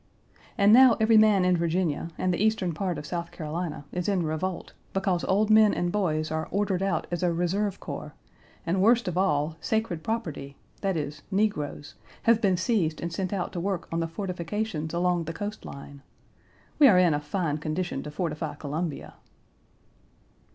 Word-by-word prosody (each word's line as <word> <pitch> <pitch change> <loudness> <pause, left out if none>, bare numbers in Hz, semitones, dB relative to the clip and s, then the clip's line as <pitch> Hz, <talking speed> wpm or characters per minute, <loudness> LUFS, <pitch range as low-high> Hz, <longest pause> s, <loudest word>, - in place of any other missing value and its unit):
And 205 0 +6
now 255 -1 +7
every 220 0 +5
man 210 -4 +5
in 180 0 +4
Virginia, 170 -1 -1
and 185 -1 0
the 180 - 0
eastern 215 -5 +1
part 180 +1 -2
of - - -6
South 170 +1 -4
Carolina 160 -2 -5
is 180 +2 -2
in 185 -4 +1
revolt, 165 +4 -3 0.2
because 190 -2 0
old 210 +3 +2
men 215 -1 +6
and 175 0 -1
boys 155 -6 0
are 160 0 -2
ordered 200 -2 0
out 195 0 0
as 175 - -2
a 180 -1 +2
reserve 185 +4 -1
corps, - - -7 0.5
and 180 +3 +1
worst 235 +2 +4
of 180 - -2
all, 155 -4 +1
sacred 220 -7 -1
property, 160 -11 -4 0.2
that 195 -3 0
is, 150 0 -4
negroes, 190 -8 -1 0.3
have 230 -1 +4
been 190 -4 +3
seized 185 -5 0
and 170 0 -4
sent 185 +1 -2
out 190 -3 -3
to 175 - -3
work 190 0 -2
on 165 - -1
the 165 - -1
fortifications 175 -1 -3
along 175 -1 0
the 165 - -4
coast 205 +5 -6
line. 140 0 -10 0.8
We 290 - +9
are 200 -8 +6
in 180 -3 +5
a 145 - 0
fine 150 -1 -2
condition 155 -1 -3
to 150 - -7
fortify 155 -1 -3
Columbia! 150 +2 -4
180 Hz, 180 wpm, -27 LUFS, 160-200 Hz, 0.8 s, We